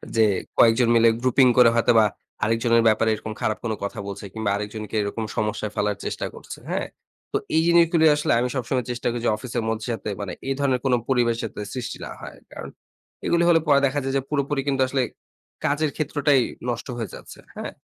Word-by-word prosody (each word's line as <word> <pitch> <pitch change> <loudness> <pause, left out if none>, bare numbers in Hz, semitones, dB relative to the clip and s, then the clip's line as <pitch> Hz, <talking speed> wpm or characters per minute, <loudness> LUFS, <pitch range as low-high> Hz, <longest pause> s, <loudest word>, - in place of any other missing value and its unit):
যে, 110 -1 +5 0.3
কয়েকজন 115 +1 +5
মিলে 115 0 +6
grouping 130 0 +4
করে 125 -2 +8
হয়তোবা 115 -1 +4 0.4
আরেকজনের 115 +1 +2
ব্যাপারে 110 +1 +3
এরকম 110 +1 -7
খারাপ 110 - 0
কোনো 110 -2 -1
কথা 100 - -4
বলছে 100 0 -6
কিংবা 110 -2 -2
আরেকজনকে 105 +1 -5
এরকম 105 +2 -3
সমস্যায় 105 0 -2
ফালার 105 -1 0
চেষ্টা - - -3
করছে। - - -10
হ্যাঁ? - - -1 0.4
তো - - +1 0.2
এই 160 - +5
জিনিসগুলি 170 -1 +4
আসলে 150 - -1
আমি 125 - +1
সবসময় 125 0 -1
চেষ্টা 120 0 -3
করি 120 - -3
যে - - +4
অফিসের 120 0 -4
মধ্যে 110 +1 -3
যাতে 110 - -5
মানে 95 -3 -4
এই 135 - +1
ধরনের 135 -3 +1
কোন 130 - +3 0.2
পরিবেশ 120 -3 +2
যাতে - - -5
সৃষ্টি 125 -3 -5
না - - -8
হয়। - - -9
কারণ - - -8 0.6
এগুলি 170 0 +2
হলে 165 - +6
পরে 140 -2 +5
দেখা 140 +2 0
যায় 135 0 -2
যে - - 0
পুরোপুরি 140 -1 0
কিন্তু 135 -2 +1
আসলে 135 0 0 0.6
কাজের 150 +1 +1
ক্ষেত্রটাই 145 -2 +2 0.3
নষ্ট 120 +2 -3
হয়ে 115 -3 -4
যাচ্ছে। - - -12 0.2
হ্যাঁ? - - -5
120 Hz, 195 wpm, -23 LUFS, 110-135 Hz, 0.6 s, করে